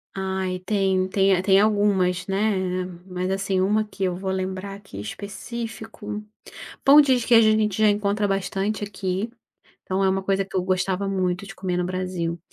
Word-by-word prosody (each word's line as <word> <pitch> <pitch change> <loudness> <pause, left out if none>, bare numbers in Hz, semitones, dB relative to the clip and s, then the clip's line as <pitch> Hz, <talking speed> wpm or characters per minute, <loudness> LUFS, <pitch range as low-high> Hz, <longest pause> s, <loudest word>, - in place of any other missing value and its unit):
Ai, 190 -1 -2
tem 190 -2 +1
tem, 195 0 +3
é, 180 - 0
tem 195 0 +5
algumas, 200 -4 +2
né. 200 +2 +1 0.5
Mas, 185 0 -3
assim, 195 -1 0
uma 210 +3 +2
que 210 -2 -6
eu 180 -1 0
vou 190 +1 -3
lembrar 190 +1 -3
aqui 195 - -10
específico: 215 - -6 0.6
pão 285 +2 +9
de 265 -3 +4
queijo 230 -2 +6
a - - +5
gente 215 -2 +1
já 215 - +6
encontra 205 0 0
bastante 195 +2 -1
aqui, 195 +1 -3 0.5
então 190 +1 -1
é 190 - +4
uma 190 0 0
coisa 195 0 +1
que 195 - -7
eu 185 - +2
gostava 185 +1 0
muito 185 0 -1
de 195 - -9
comer 180 -2 -2
no 180 - 0
Brasil. 180 -2 -3
195 Hz, 175 wpm, -24 LUFS, 185-205 Hz, 0.6 s, pão